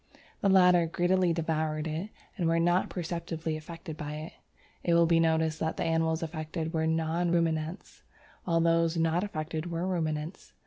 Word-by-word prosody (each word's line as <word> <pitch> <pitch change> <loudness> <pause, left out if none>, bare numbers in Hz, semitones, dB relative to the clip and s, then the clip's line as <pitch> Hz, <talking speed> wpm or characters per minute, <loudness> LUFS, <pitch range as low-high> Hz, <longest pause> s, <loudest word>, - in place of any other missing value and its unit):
The 200 - +2
latter 180 -3 +5
greedily 175 +1 +2
devoured 160 -2 -1
it 160 +6 -3 0.3
and 175 -5 0
were 165 0 +2
not 175 +2 +2
perceptibly 165 -2 -3
affected 160 +1 -8
by 150 0 -5
it. 155 +2 -7 0.5
It 170 - +2
will 170 0 +6
be 165 0 +3
noticed 160 -1 +1
that 160 - -2
the - - -1
animals 165 0 +1
affected 160 0 -4
were 160 -1 +1
non 165 +2 0
ruminants, 165 +1 -1 0.4
while 165 -2 +1
those 165 0 +2
not 165 +2 +1
affected 160 -3 -4
were 170 +1 -2
ruminants. 160 -2 -3
165 Hz, 165 wpm, -29 LUFS, 160-175 Hz, 0.5 s, will